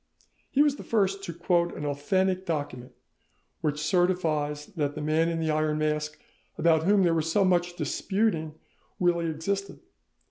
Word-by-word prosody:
He 285 - +4
was 290 -1 +1
the - - -8
first 195 -3 0
to - - -4
quote 170 +1 0
an 150 - -4
authentic 185 +6 0
document 145 -6 -4 0.7
which 150 -1 -1
certifies 155 -3 0
that 150 -8 -3
the - - -5
Man 160 +2 +2
in 165 -1 -2
the 160 -1 0
Iron 155 0 +1
Mask 150 0 -1 0.4
about 160 -1 +3
whom 200 0 +4
there 170 -2 +3
was 165 0 0
so 200 +2 +3
much 175 -1 +1
disputing 185 -7 -1 0.4
really 170 -2 +2
existed. 195 +6 -3
165 Hz, 155 wpm, -27 LUFS, 155-185 Hz, 0.7 s, He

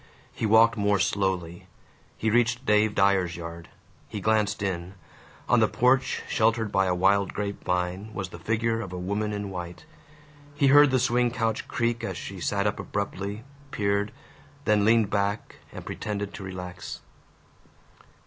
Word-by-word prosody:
He 110 - -2
walked 115 +2 +5
more 100 0 +2
slowly. 95 -3 -1 0.5
He 110 - 0
reached 120 +2 +2
Dave 105 -1 +3
Dyer's 95 -3 +2
yard. 85 0 -8 0.4
He 105 - -5
glanced 105 0 +1
in. 95 -1 -3 0.5
On - - +4
the - - +4
porch, 125 +1 +2
sheltered 110 -1 +1
by 95 0 +2
a 90 - +1
wild 100 +2 +2
grape 100 -1 -4
vine, 90 +4 -2
was 95 -2 -5
the 85 - -10
figure 115 +4 0
of 100 -6 -7
a 90 - -5
woman 100 +4 -2
in 100 -1 -4
white. 90 +2 -7 0.7
He 140 -2 +3
heard 145 +1 +7
the 130 - +2
swing 125 -1 +2
couch 115 -2 -2
creak 115 -1 -1
as 95 -5 -3
she 95 0 -7
sat 100 +3 -1
up 105 - 0
abruptly, 100 +1 -4 0.3
peered, 100 -2 0 0.5
then 105 -1 +3
leaned 110 -2 +4
back 100 +1 -1
and - - -9
pretended 100 -1 -4
to 100 - -8
relax. 90 -1 -7
100 Hz, 160 wpm, -26 LUFS, 95-110 Hz, 0.7 s, heard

